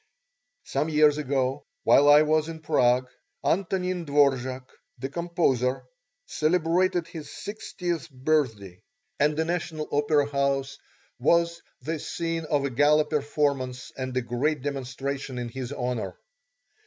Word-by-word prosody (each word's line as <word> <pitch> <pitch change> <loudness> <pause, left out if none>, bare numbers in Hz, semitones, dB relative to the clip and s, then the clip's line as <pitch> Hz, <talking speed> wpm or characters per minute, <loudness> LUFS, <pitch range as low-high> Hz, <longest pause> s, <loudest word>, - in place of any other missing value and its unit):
Some 155 - -1
years 150 -1 +4
ago, 135 -1 -1 0.2
while 145 +1 +6
I 145 +1 +8
was 155 +1 +1
in 160 -1 -7
Prague, 125 -3 +2 0.4
Antonin 185 0 0
Dvorák, 135 -3 +1 0.3
the 135 - -4
composer, 135 -6 0 0.4
celebrated 175 +2 +1
his 160 -3 -8
sixtieth 180 -5 -5
birthday, 125 - -1 0.4
and 150 +1 +2
the 160 - +1
National 165 -2 -3
Opera 145 0 +2
house 140 -1 -1 0.4
was 170 +5 +2 0.2
the 160 0 -3
scene 165 0 -3
of 145 -3 +1
a 140 - -2
gala 150 +4 +4
performance 140 -4 -1
and 130 -1 -4
a - - +2
great 130 +4 -1
demonstration 135 -1 -4
in 120 -1 -3
his 130 +1 -6
honour. 125 -8 -3
145 Hz, 125 wpm, -26 LUFS, 130-160 Hz, 0.4 s, I